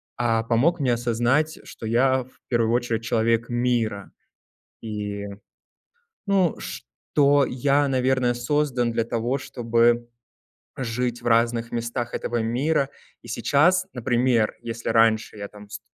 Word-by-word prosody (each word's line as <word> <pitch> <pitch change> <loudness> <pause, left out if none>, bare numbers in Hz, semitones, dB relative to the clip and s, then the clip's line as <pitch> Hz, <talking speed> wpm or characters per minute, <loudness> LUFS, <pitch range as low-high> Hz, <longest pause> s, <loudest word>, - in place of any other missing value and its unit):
а, 115 -2 +1
помог 125 +10 +2
мне 130 -4 +2
осознать, 120 +6 0
что - - -9
я 130 +3 +2
в 130 - -23
первую 115 -2 +1
очередь 120 -1 0
человек 115 -1 +1
мира. 120 -4 -1 0.7
И, 105 -2 -4 1.0
ну, 195 -4 +2
что 145 -1 0
я, 140 +3 +1
наверное, 130 -1 +1
создан 125 -1 0
для 115 0 0
того, 120 +4 -1
чтобы 120 -1 +1 0.7
жить 120 -1 -2
в - - -5
разных 115 0 +2
местах 120 0 -3
этого 120 -1 -2
мира. 135 +5 0 0.3
И - - -14
сейчас, 180 +6 +3
например, 120 -2 +1
если 115 0 -5
раньше 110 -1 +2
я 100 0 -5
там 105 0 -14
вс 105 0 -7
120 Hz, 130 wpm, -24 LUFS, 115-130 Hz, 1.0 s, сейчас